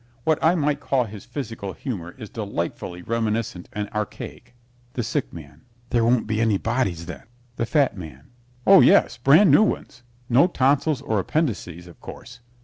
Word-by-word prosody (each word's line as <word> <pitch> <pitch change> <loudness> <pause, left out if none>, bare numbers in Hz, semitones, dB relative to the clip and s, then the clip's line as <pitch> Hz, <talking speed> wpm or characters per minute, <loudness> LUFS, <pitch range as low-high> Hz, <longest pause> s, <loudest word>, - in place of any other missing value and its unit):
What 160 +2 +1
I 165 +3 +4
might 150 -3 0
call 130 -2 +1
his 105 -3 -10
physical 115 -6 -6
humor 90 -11 -6
is 110 -5 -9
delightfully 90 -4 -5
reminiscent 110 -5 -2
and 105 -1 -4
archaic. 105 +2 -6 0.4
THE 120 - -2
SICK 130 +5 -2
MAN 75 -2 -12 0.3
There 120 -1 +2
won't 120 +1 +2
be 110 0 -1
any 110 -3 +2
bodies, 100 -8 -1
then? - - -9 0.3
THE 115 - -1
FAT 145 -4 +2
MAN 75 - -11 0.3
Oh, - - +8
yes, - - +4
brand 155 +6 +5
new 145 - +7
ones. 125 - -2 0.3
No 130 +8 +5
tonsils 140 -2 +1
or 110 -6 0
appendixes, 95 - -2
of 85 - -16
course. 125 0 -11
115 Hz, 165 wpm, -23 LUFS, 100-135 Hz, 0.4 s, Oh